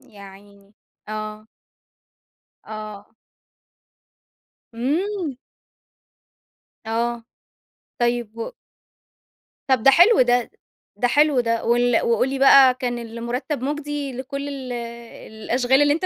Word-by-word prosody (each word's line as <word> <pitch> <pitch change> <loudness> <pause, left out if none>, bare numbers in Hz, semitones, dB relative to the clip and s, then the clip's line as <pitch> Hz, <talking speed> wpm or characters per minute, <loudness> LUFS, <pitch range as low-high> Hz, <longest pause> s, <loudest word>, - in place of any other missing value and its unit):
يا 225 -7 -16
عيني، 200 +1 -16 0.3
آه. 215 0 -6 1.2
آه. 215 -2 -9 1.6
امم! 315 - -2 1.5
آه، 230 +1 -2 0.8
طيّب 240 -2 -1
و 230 - -5 1.2
طب 260 -4 +2
ده 270 - +7
حلو 355 - +6
ده، 245 -1 +2 0.5
ده 245 - +1
حلو 295 +1 +3
ده 230 -1 -1
وال 240 0 +3
وقُل 235 +2 +1
لي 270 0 -3
بقى 270 -1 +7
كان 245 -1 -3
المرتب 235 +4 -4
مُجدي 290 -1 -3
لكل 275 +3 -5
ال 265 -3 -6 0.6
الأشغال 245 +5 +1
اللي 290 0 +4
أنت 330 +5 -2
245 Hz, 100 wpm, -22 LUFS, 230-275 Hz, 1.6 s, ده